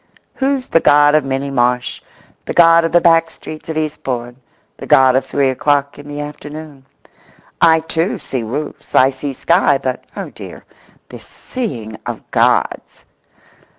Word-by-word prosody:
Who's 270 -1 -1
the 165 - +4
God 145 -1 +5
of 155 -1 +3
Minnie 135 +1 -3
Marsh, 125 -1 0 0.4
the - - -5
God 165 -1 +6
of 165 - -2
the 175 - +5
back 165 -1 +3
streets 155 0 -10
of 160 - -3
Eastbourne, 125 -6 -4 0.4
the - - -9
God 130 -1 +5
of 130 - 0
three 140 -2 +1
o'clock 140 +2 0
in 145 - -11
the 145 0 -6
afternoon? 145 -1 -9 0.7
I, 160 -1 +5
too, 165 +3 -2
see 130 - -5
roofs, 125 +7 -6
I 130 +1 +5
see 135 +2 -5
sky; 165 0 +2
but, 130 -2 -4
oh, - - -5
dear—this - - -14
seeing 120 - -6
of - - -5
Gods! - - 0
145 Hz, 150 wpm, -17 LUFS, 130-160 Hz, 0.7 s, God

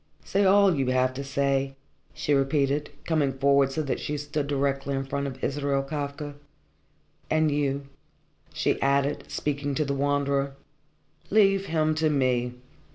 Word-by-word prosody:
"Say 200 +1 +2
all 195 0 +5
you 135 -4 0
have 130 0 +2
to 140 +2 -5
say," 135 0 0 0.4
she 150 - -1
repeated, 140 +1 +1 0.2
coming 150 -5 +1
forward 140 0 +3
so 155 +3 -1
that 135 - -2
she 150 - -3
stood 145 0 -3
directly 140 -1 -1
in 135 0 -2
front 140 +1 -2
of 130 -1 -8
Israel 140 -1 0
Kafka. 145 +1 -4 1.0
"And 155 -1 +2
you," 140 -1 -1 0.6
she - - 0
added, 140 +1 +1
speaking 145 -1 -2
to 155 - +1
the 140 - -1
Wanderer, 140 0 0 0.7
"leave 195 -2 +4
him 155 -1 +1
to 155 0 +1
me. 125 -4 +1
140 Hz, 150 wpm, -26 LUFS, 135-150 Hz, 1.0 s, all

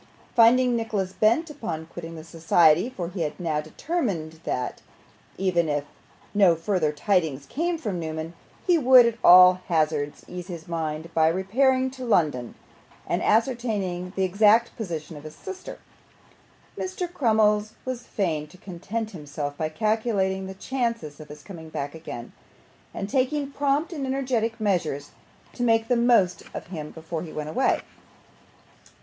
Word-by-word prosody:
Finding 245 +1 +5
Nicholas 210 -5 -2
bent 265 +10 +2
upon 165 - -5
quitting 165 0 -8
the 160 - -8
society 165 +3 +3
for 180 -10 -5
he 180 -1 -5
had 155 +2 -3
now 160 -4 -1
determined 165 - -3
that, 125 -1 -3 0.6
even 175 -4 +1
if 145 -1 -1 0.5
no 195 -5 +5
further 165 -2 0
tidings 150 -4 0
came 335 - -1
from 210 - -3
Newman, 160 0 -5 0.3
he 350 -3 +4
would, 255 -3 +8
at 230 -1 -1
all 180 0 +8
hazards, 155 -3 0
ease 180 0 -7
his 170 -4 -8
mind 160 -1 -4
by 160 -1 +4
repairing 255 +9 +2
to 260 0 -9
London 150 - +1 0.5
and - - -1
ascertaining 210 -6 0
the 190 - +1
exact 210 +5 +4
position 165 -7 -5
of 145 - -11
his 155 0 -9
sister 380 -1 -8 1.0
Mr. 370 -1 -3
Crummles 215 -5 +2
was 255 -2 -3
fain 165 -10 -2
to 155 - -17
content 200 +5 -5
himself 145 -4 -5
by 155 +1 -2
calculating 200 0 0
the 190 - -7
chances 230 - -3
of 155 - -10
his 150 0 -11
coming 160 -5 -10
back 145 -2 -4
again, 140 -7 -8 0.6
and 195 - -4
taking 275 +5 0
prompt 285 +4 0
and 280 -4 -3
energetic 250 -4 -1
measures 165 -9 -1 0.4
to - - -7
make 225 -1 +2
the 245 - +4
most 235 -7 +3
of - - -5
him 150 -3 -5
before 160 0 -6
he 165 - -7
went 150 0 -5
away. 260 +12 +1
190 Hz, 150 wpm, -25 LUFS, 160-235 Hz, 1.0 s, would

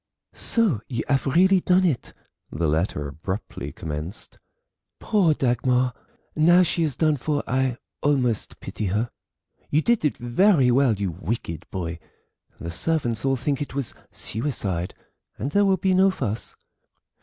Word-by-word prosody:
"So 210 - +1
you 120 -3 -2
have 140 0 +1
really 185 +7 +5
done 185 +1 +3
it!" 150 -9 -1 0.3
the 80 +1 -1
letter 75 -1 0
abruptly 95 +8 -5
commenced; 80 +5 -7 0.6
"Poor 190 -8 +3
Dagmar. 125 0 +1 0.4
Now 175 +4 +6
she 170 0 0
is 155 -6 0
done 155 -2 +2
for 145 +2 -1
I 130 0 0 0.2
almost 130 -6 0
pity 105 - -4
her. 105 +5 -1 0.6
You 155 +2 +2
did 235 -5 +2
it 150 - +1
very 130 - +4
well, 125 -2 +4
you 100 -2 -2
wicked 90 -1 -4
boy, 85 -3 -4 0.6
the 85 - -5
servants 120 - 0
all 135 0 +3
think 135 +3 -1
it 140 -2 -5
was 140 -4 -2 0.2
suicide, 100 - -3 0.4
and 135 +7 -3
there 205 +5 +4
will 190 -1 +3
be 190 +1 +1
no 190 +1 +5
fuss. 115 - -3
130 Hz, 145 wpm, -24 LUFS, 105-160 Hz, 0.6 s, Now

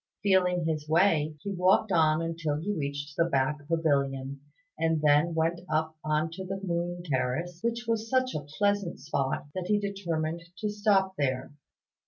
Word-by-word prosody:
Feeling 180 -3 +3
his 155 -2 -2
way, 160 -3 +3
he 200 - -3
walked 190 +3 +3
on 160 -1 +3
until 165 -2 -2
he 200 +6 -2
reached 145 -1 -4
the 170 - +3
back 145 -1 0
pavilion, 140 -4 0 0.3
and 165 -1 +1
then 150 +3 +3
went 165 +2 0
up 160 +1 0
on 155 +1 0
to 190 +3 -6
the 195 +1 -4
Moon 175 -1 -2
Terrace, 160 +5 -1
which 235 +1 -1
was 225 -1 -1
such 255 -1 +2
a 155 - -2 0.2
pleasant 200 -3 +1
spot 140 -2 -2
that 185 -1 -4
he 210 - +3
determined 170 -5 -2 0.2
to 210 - -2
stop 205 -2 +2
there. 130 0 -1
165 Hz, 165 wpm, -28 LUFS, 150-190 Hz, 0.3 s, Feeling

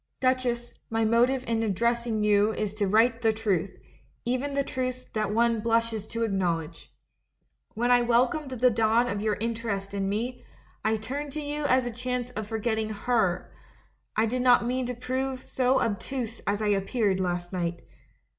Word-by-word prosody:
"Duchess, 255 -2 0 0.2
my 225 0 +1
motive 245 +4 +3
in 225 -1 0
addressing 230 +1 0
you 210 0 +4
is 210 -2 -2
to 210 -1 0
write 230 +3 +3
the 225 -1 +4
truth, 200 -4 -1 0.5
even 255 +4 -1
the 280 - +2
truths 255 -1 -3
that 215 -2 0
one 230 +1 +2
blushes 230 -1 0
to 230 0 -2
acknowledge. 170 -6 -2 0.8
When 240 +3 +1
I 245 0 +6
welcomed 245 +5 +2
the 250 -1 +3
dawn 225 +2 +3
of 200 -3 -2
your 215 -1 +1
interest 220 -3 -3
in 195 -1 -1
me, 235 +5 -3 0.4
I 220 0 +2
turned 275 +7 -5
to 305 - -3
you 295 0 -3
as 255 -2 +3
a 245 - -2
chance 250 +1 -3
of 215 -3 -5
forgetting 220 0 -1
her 215 -4 0 0.3
— - - -40
I 220 - +4
did 250 +3 -1
not 245 -1 +5
mean 250 +1 -1
to 250 - -3
prove 260 +1 -3
so 260 0 +2
obtuse 230 +2 -3
as 205 +2 0
I 210 - +1
appeared 200 0 +1
last 175 0 -2
night. 170 -2 -2
230 Hz, 175 wpm, -27 LUFS, 210-250 Hz, 0.8 s, I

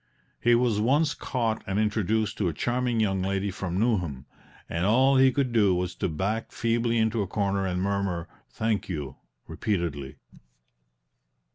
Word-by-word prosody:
He 120 0 +4
was 120 -3 +2
once 145 +6 +2
caught 115 -4 -2
and 95 +1 -1
introduced 110 0 0
to 100 - +1
a 85 - -1
charming 120 +5 0
young 95 -3 +1
lady 95 +1 -1
from 95 -1 -3
Newnham, 90 - 0 0.4
and 85 +1 -2
all 130 +7 +4
he 130 0 +6
could 135 -2 0
do 100 -5 +4
was 90 0 -2
to - - -2
back 100 +8 -2
feebly 115 0 0
into 110 0 +1
a 100 - -2
corner 100 -1 0
and 90 -1 -1
murmur 100 -4 -1 0.2
"Thank 110 -3 -1
you," 75 -7 -5 0.3
repeatedly. 80 -9 -3
105 Hz, 155 wpm, -27 LUFS, 90-115 Hz, 0.4 s, he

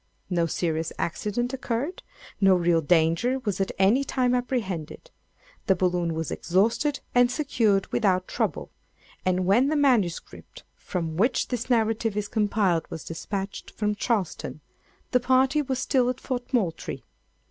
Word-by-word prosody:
No 170 -2 +2
serious 165 -1 -1
accident 225 +8 -2
occurred. 265 +6 -3 0.4
No 195 -1 +6
real 170 -2 +2
danger 165 - +2
was 195 -2 -1
at 195 - 0
any 205 +8 +4
time 255 -2 +1
apprehended. 245 - -3 0.6
The 190 - +4
balloon 175 -2 0
was 160 -1 -3
exhausted 230 - +1
and 245 0 +5
secured 235 -8 +1
without 185 -4 +2
trouble; - - -2 0.6
and 185 0 +1
when 225 +8 +4
the 310 - +1
MS. 245 - +3 0.6
from 165 -3 -4
which 235 +7 +1
this 245 0 -3
narrative 225 -2 +1
is 205 -1 -1
compiled 205 -6 +1
was 160 - -6
despatched 195 +4 -5
from 210 -1 -1
Charleston, 205 -8 -2 0.5
the 250 - +4
party 260 +4 +3
were 265 -2 -2
still 255 -1 +1
at 250 - -3
Fort 250 -1 -4
Moultrie. 195 - -2
210 Hz, 140 wpm, -26 LUFS, 180-250 Hz, 0.6 s, No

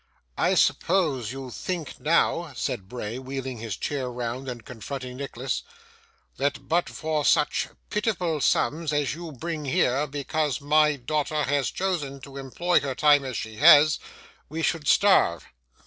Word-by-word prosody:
'I - - +2
suppose 150 - +2
you 135 -1 -7
think 175 +3 -5
now,' 165 0 +1
said 95 -5 -3
Bray, 120 0 -5
wheeling 130 -2 -5
his 110 -3 -5
chair 135 -4 -3
round 125 +2 -4
and 120 -2 -7
confronting 125 +2 -7
Nicholas, 135 -2 -3 0.8
'that, 140 +2 -2
but 170 +2 +1
for 155 -2 -2
such 150 +1 +2 0.2
pitiful 180 -8 0
sums 155 +2 +1
as 145 -2 0
you 165 0 -7
bring 155 +2 -5
here, 135 +2 +1
because 145 +1 -2
my 150 +1 +3
daughter 150 +3 -1
has 145 -1 +1
chosen 160 -8 -2
to 140 0 -10
employ 170 +7 +1
her 135 -2 -4
time 145 -1 +5
as 130 -3 -4
she 110 -1 -6
has, 150 +1 +7 0.5
we 160 +3 -4
should 155 -3 0
starve? 190 - +4
145 Hz, 150 wpm, -26 LUFS, 130-155 Hz, 0.8 s, has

